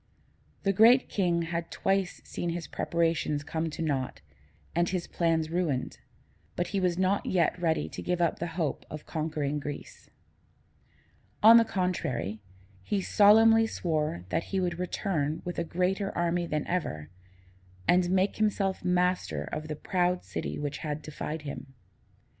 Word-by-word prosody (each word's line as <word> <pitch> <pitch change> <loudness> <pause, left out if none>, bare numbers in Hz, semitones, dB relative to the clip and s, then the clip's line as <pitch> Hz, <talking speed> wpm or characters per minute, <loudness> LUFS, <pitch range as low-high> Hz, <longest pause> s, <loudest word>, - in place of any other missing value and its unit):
The 195 - +2
Great 235 +6 +6
King 175 -4 +1
had 170 0 -3
twice 195 -1 -1
seen 175 - -4
his 170 -1 -3
preparations 165 -3 0
come 160 +2 -2
to 160 - -4
naught 135 -5 -2 0.5
and 170 +1 +1
his 180 -2 -2
plans 165 -2 0
ruined, 165 -7 -1 0.6
but 175 - -1
he 200 - -1
was 180 -2 +1
not 190 +2 +1
yet 175 -3 +2
ready 160 -2 +1
to - - -7
give 180 0 -1
up 170 -2 +1
the 170 - -2
hope 160 -5 -1
of 155 -1 -8
conquering 150 -2 -2
Greece. 145 0 -8 1.3
On 225 +2 +10
the 230 - +7
contrary, 170 - -2 0.4
he 200 - -1
solemnly 225 +3 +6
swore 150 - -2
that 165 - -1
he 195 - -2
would 175 -2 -1
return 160 -4 -2
with 175 -1 -3
a - - +1
greater 185 +4 -1
army 170 0 0
than 150 -2 -1
ever, 75 - -3 0.8
and 180 0 +4
make 190 +2 +2
himself 200 -3 0
master 180 - +1
of 155 +1 -4
the 155 - -4
proud 180 +2 0
city - - -4
which 145 -1 -4
had 150 -1 -4
defied 155 +1 -5
him. 140 -2 -8
170 Hz, 155 wpm, -29 LUFS, 155-185 Hz, 1.3 s, On